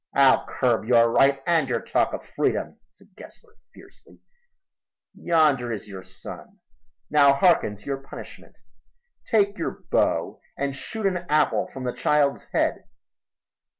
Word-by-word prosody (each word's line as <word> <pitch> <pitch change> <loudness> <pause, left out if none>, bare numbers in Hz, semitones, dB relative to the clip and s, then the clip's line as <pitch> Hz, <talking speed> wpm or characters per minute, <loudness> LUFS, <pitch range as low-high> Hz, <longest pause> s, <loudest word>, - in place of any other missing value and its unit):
"I'll 135 -1 +4
curb 120 -4 0
your 115 -1 +4
right 135 +2 +3
and 165 -6 +1
your 120 -2 0
talk - - 0
of - - -6
freedom," - - -1
said - - -25
Gessler 445 -2 -16 0.2
fiercely. - - -19 1.0
"Yonder 150 -8 +1
is 105 -2 -6
your 95 -2 -9
son. 95 - -12 0.5
Now 140 -2 +6
harken 140 - +3
to 105 - -21
your 135 -1 -4
punishment. - - -12 0.7
Take 205 -3 +1
your 165 - -5
bow - - 0 0.2
and 140 0 -2
shoot 220 +9 -6
an 190 -2 +1
apple 150 0 +1
from 130 - -8
the 125 -1 -2
child's 145 -2 +1
head." - - -1
140 Hz, 140 wpm, -24 LUFS, 120-165 Hz, 1.0 s, Now